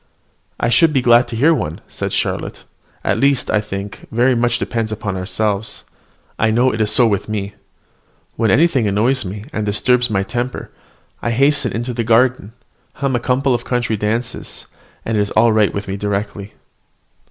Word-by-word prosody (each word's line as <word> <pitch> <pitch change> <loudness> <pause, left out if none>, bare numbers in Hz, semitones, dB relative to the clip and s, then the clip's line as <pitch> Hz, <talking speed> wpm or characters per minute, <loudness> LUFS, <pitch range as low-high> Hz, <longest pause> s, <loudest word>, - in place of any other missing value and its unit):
"I 120 - +1
should 150 +7 +4
be 135 - +2
glad 120 0 +5
to - - -6
hear 145 +8 +4
one," 80 - -3
said - - -4
Charlotte: - - -3 0.4
"at 100 - 0
least, 140 -1 +2
I 105 - +2
think 100 -1 -7
very 125 +3 +3
much 120 0 +1
depends 115 -3 -2
upon 105 -2 -3
ourselves; 100 +3 -2 0.6
I 110 - +3
know 120 +4 +2
it 110 - -2
is 105 - +1
so 115 +3 +4
with 105 -2 0
me. 100 -1 -3 0.8
When 115 -1 +1
anything 135 - +3
annoys 115 +6 +1
me, 100 +2 -7
and 110 - -2
disturbs 120 +4 +2
my 100 -3 0
temper, 120 +4 -4 0.5
I - - -1
hasten 140 +2 +2
into 120 +3 -3
the 115 0 -2
garden, 115 -1 +2 0.4
hum 140 -2 -1
a - - +1
couple 130 +2 +1
of 120 0 -1
country 120 -3 -1
dances, 110 +3 -3 0.4
and 110 -1 -1
it - - +3
is 100 - -1
all 110 +1 +3
right 110 -2 +3
with 100 +1 -5
me 95 +1 -3
directly." 100 0 -4
115 Hz, 180 wpm, -18 LUFS, 105-125 Hz, 0.8 s, glad